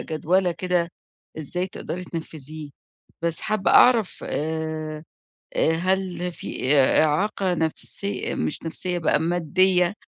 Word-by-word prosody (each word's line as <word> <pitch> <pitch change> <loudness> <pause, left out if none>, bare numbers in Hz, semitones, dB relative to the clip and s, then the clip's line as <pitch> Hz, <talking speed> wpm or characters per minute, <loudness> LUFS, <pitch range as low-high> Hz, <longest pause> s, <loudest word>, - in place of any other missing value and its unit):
جَدوَلة 175 +3 0
كده 175 0 0 0.5
إزاي 175 +5 -2
تقدري 180 -1 -6
تنفِّذيه. 155 -3 -7 0.5
بس 170 -1 +1
حابَّة 215 -2 0
أعرف، 230 -6 +5
آآ، 155 0 -3 0.5
آآ، 160 - +3
هل 180 0 -1
في 145 -3 0
إعاقة 160 +7 +3
نفسية 170 +5 -1
مش 80 0 -2
نفسية 175 +2 -2
بقى، 160 -1 +2
مادية، 175 +2 +2
170 Hz, 105 wpm, -24 LUFS, 155-185 Hz, 0.5 s, أعرف